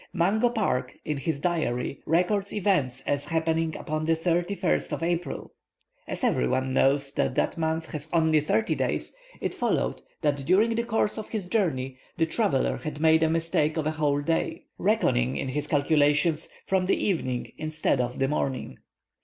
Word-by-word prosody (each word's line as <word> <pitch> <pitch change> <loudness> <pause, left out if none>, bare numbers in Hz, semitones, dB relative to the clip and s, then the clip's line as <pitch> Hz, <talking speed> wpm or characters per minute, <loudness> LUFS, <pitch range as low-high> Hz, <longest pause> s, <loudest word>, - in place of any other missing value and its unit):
Mungo 210 +7 +2
Park 190 - -1
in 150 - -1
his 140 +1 -2
diary 140 -7 -1
records 195 +5 +1
events 160 -11 0
as 145 +1 -2
happening 160 -1 0
upon 155 +1 -3
the 165 - +3
31st 175 +4 0
of - - -3
April. 170 +1 -2 0.5
As - - -5
every 60 - +2
one 130 - 0
knows 140 +1 +2
that 130 - 0
that - - +1
month 160 0 -1
has 155 0 -5
only 160 -2 +4
thirty 215 +9 +1
days, - - -2 0.3
it - - -1
followed - - 0 0.2
that 145 -2 +1
during 190 +11 +3
the 235 +1 -1
course 220 -1 0
of 215 - -7
his 215 -5 -3
journey 135 - -1 0.2
the 165 - +3
traveller 160 - +1
had 150 -1 -6
made 160 0 +5
a 160 - +3
mistake 165 -1 +1
of 155 - -1
a 155 - +1
whole 145 -2 +1
day, 165 +2 -1 0.2
reckoning 60 +3 +2
in 130 - -2
his 145 +3 -2
calculations 150 +2 +2 0.2
from 190 -1 +1
the - - +3
evening 130 -11 -1
instead 155 -4 0
of 125 0 -3
the 135 - +1
morning. 135 - -2
160 Hz, 170 wpm, -27 LUFS, 140-175 Hz, 0.5 s, made